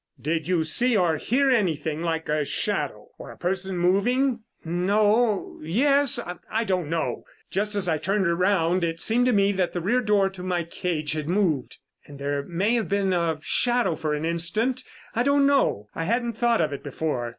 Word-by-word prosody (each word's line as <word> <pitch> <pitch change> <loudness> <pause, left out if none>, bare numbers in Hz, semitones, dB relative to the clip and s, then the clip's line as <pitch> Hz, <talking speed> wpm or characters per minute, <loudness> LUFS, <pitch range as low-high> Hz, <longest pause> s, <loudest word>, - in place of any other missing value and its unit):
"Did 160 +1 -2
you 180 -3 +2
see 235 +9 +2
or 170 -4 +2
hear 265 - +1
anything 160 - 0
like 165 -1 -2
a 150 -1 +1
shadow - - -2
or - - -9
a - - -11
person 190 +1 -2
moving?" 235 +9 +2 0.3
"No 205 +5 +1
yes 275 - +2 0.3
I 225 +1 +1
don't 185 -7 -1
know. 165 0 -2 0.3
Just 210 +2 -1
as 195 -2 +1
I 160 -2 +1
turned 195 +4 0
around 180 0 +2
it 165 0 -2
seemed 245 +6 +2
to - - +4
me 200 -2 +3
that 185 -3 -1
the 175 - -2
rear 220 +9 +1
door 205 -3 +2
to 190 -2 -10
my 180 -1 -1
cage 165 -2 -3
had 155 0 -3
moved 175 -9 0 0.3
and 145 - -11
there 140 0 -2
may 180 +9 -1
have 230 -6 0
been 195 -1 +1
a 170 -3 0
shadow 240 -8 +1
for 155 -1 -2
an 150 +2 -3
instant. 195 +10 -1 0.3
I 235 - 0
don't 280 +2 +3
know. 275 - +2
I 165 - -3
hadn't 235 +4 0
thought 235 -1 +2
of 150 -3 0
it 140 - -6
before." 140 -4 -3
185 Hz, 190 wpm, -25 LUFS, 160-225 Hz, 0.3 s, to